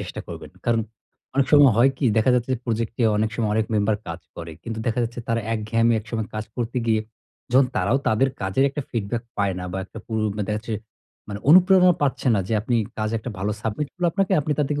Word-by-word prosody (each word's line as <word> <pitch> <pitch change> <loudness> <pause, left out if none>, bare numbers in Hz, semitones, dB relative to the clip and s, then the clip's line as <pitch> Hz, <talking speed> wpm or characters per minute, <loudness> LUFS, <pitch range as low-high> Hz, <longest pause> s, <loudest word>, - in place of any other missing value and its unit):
চেষ্টা - - -6
করবেন। - - -8
কারণ 115 -1 +2 0.5
অনেক 135 -1 +3
সময় 145 -5 +8
হয় 125 +4 +5
কী? - - -1
দেখা 110 +3 +4
যাচ্ছে 125 +1 0
যে - - -5
প্রজেক্টে 115 0 -2
অনেক 110 +1 +1
সময় 110 -3 0
অনেক 110 -1 +1
মেম্বার 105 0 +2
কাজ 85 +1 -5 0.2
করে। 85 -1 -7
কিন্তু 110 -1 -5
দেখা 115 +2 +1
যাচ্ছে 120 +1 -4
তারা 115 0 +1
এক 115 - 0
ঘেয়েমি 115 0 +3
একসময়ে 110 0 -4
কাজ 110 0 -3
করতে 120 +1 -2
গিয়ে 110 -1 +3 0.5
যখন 130 +1 +6
তারাও 130 +3 +2
তাদের 130 +5 +3
কাজের 95 +8 +1
একটা 145 +1 -4
ফিডব্যাক 115 0 -2
পায় 100 -2 0
না। 90 - -5
বা 95 - -2
একটা 110 - -11
পুরু 110 -1 -2 0.2
মা 105 - -1
দেখা 105 - 0
যাচ্ছে 110 0 -5 0.5
মানে 100 - -5
অনুপ্রেরণা 180 +1 +7
পাচ্ছে 140 -1 0
না 100 - +2
যে - - -2
আপনি 120 +2 0 0.2
কাজ 110 0 -1
একটা 120 +3 -6
ভালো 100 +2 -1
সাবমিট 110 +7 -2
করলে 180 -1 -1
আপনাকে 195 -1 0
আপনি 150 +1 -1
তা 150 - +4
থেকে 145 0 -1
115 Hz, 225 wpm, -23 LUFS, 110-135 Hz, 0.5 s, সময়